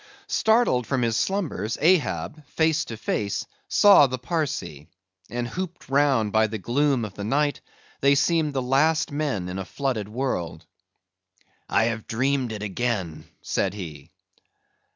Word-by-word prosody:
Started 220 - +2
from 130 -3 0
his 115 -1 +1
slumbers, 140 - -1
Ahab, 155 - +1
face 160 0 +1
to 115 - -7
face, 100 -3 -2 0.2
saw 200 -8 +7
the 130 0 -3
Parsee; 130 - -3 0.4
and 120 0 -3
hooped 180 +3 -6
round 135 -6 +2
by 110 +1 +3
the 110 0 -4
gloom 130 +3 +1
of 100 - -8
the 105 - -7
night 145 +6 0 0.4
they 140 +1 +4
seemed 155 +1 +2
the 130 - 0
last 145 +5 +2
men 145 -11 -2
in 90 +1 -4
a - - -3
flooded 110 0 -3
world. 90 -9 -3 1.0
"I - - +3
have 115 -1 -2
dreamed 130 +1 0
it 105 -1 -5
again," 95 -7 -2 0.2
said 95 0 -1
he. 80 -6 -8
125 Hz, 145 wpm, -25 LUFS, 105-145 Hz, 1.0 s, saw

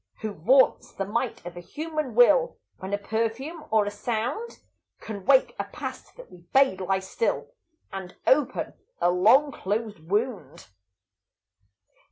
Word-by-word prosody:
Who 215 -1 -3
vaunts 250 - +3
the 195 - -3
might 230 0 -3
of 175 0 -7
a - - -7
human 305 - -4
will, 485 - +5 0.2
When 190 +1 -6
a 205 - +1
perfume 230 +10 -3
or 215 -1 +3
a 205 - -3
sound 240 - -3 0.4
Can 205 -4 -8
wake 265 -1 +4
a - - -1
Past - - -8
that - - -13
we 180 - -13
bade 265 +1 +2
lie 190 +1 +1
still, 190 - -2 0.4
And 190 -2 -7
open 275 0 +2 0.3
a 175 - +3
long 225 +11 +5
closed 210 - -3
wound? 205 - -3
220 Hz, 145 wpm, -26 LUFS, 195-270 Hz, 0.4 s, will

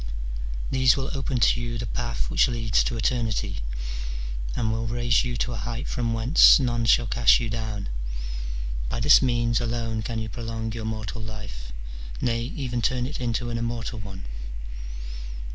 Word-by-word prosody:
These 130 -1 +5
will 135 0 -2
open 135 -2 -1
to 120 0 +4
you 120 0 -3
the 115 - -3
path 120 0 -2
which - - +5
leads 115 -3 +2
to 120 - -1
eternity, 115 -1 0 1.0
and 110 -2 +1
will 115 +1 -1
raise 120 0 +2
you 125 -1 -2
to 120 - -1
a - - -4
height 120 +2 -4
from 120 -2 -1
whence 115 +9 +7
none 120 -3 +1
shall 120 +1 +5
cast 120 +3 +5
you 115 -3 -2
down. 110 -3 -3 1.0
By - - -2
this 145 +5 +7
means 120 -2 +2
alone 115 -1 -1
can 115 0 -3
you 110 0 -2
prolong 115 -1 -4
your 115 -1 -4
mortal 110 0 -4
life, 105 - -7 0.5
nay, 115 -1 +1
even 125 -4 -2
turn 125 +2 +1
it 135 0 -5
into 120 0 -1
an 115 - -1
immortal 115 0 -3
one. 95 -5 -7
115 Hz, 165 wpm, -26 LUFS, 110-120 Hz, 1.0 s, whence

